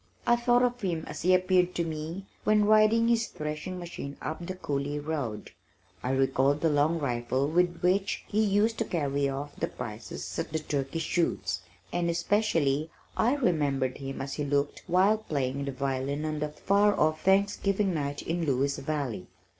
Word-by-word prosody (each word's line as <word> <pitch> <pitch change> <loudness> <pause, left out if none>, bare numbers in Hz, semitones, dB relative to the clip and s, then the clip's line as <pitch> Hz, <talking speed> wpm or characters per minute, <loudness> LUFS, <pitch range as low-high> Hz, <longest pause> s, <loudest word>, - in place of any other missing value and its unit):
I 240 - +5
thought 240 +1 +3
of 245 0 0
him 170 -5 -1
as - - -7
he 185 - +3
appeared 185 -1 +2
to 170 - +1
me 165 +4 -5 0.2
when 210 -1 +4
riding 215 +2 +5
his 235 -1 +2
threshing 150 +4 -5
machine 170 -5 -7
up 160 +3 -5
the 185 +2 -5
coulee 145 -4 -2
road. 145 -8 -4 0.5
I 125 - -3
recalled 135 +2 +2
the 165 - +3
long 150 +3 +2
rifle 130 -1 0
with 175 +2 +1
which 190 +2 +1
he 215 - +1
used 210 +2 +2
to 225 - +1
carry 140 -5 0
off 140 +2 -5
the - - -2
prizes 85 +6 -6
at - - -3
the - - +2
turkey 145 -1 -2
shoots, 160 - 0 0.3
and 175 -1 +1
especially 165 -5 +1 0.3
I 245 +5 +3
remembered 145 - 0
him 135 -1 -5
as 135 - -5
he 150 - -2
looked 145 0 0
while 190 +5 +4
playing 140 -8 -2
the 140 - -2
violin 135 +2 -2
on 155 -1 -2
that 150 0 -4
far 205 +1 +3
off 155 +1 +2
Thanksgiving 195 0 +2
night 145 -2 -3
in 170 +1 -1
Lewis 140 -1 +1
Valley. 135 -10 -3
155 Hz, 175 wpm, -28 LUFS, 140-190 Hz, 0.5 s, I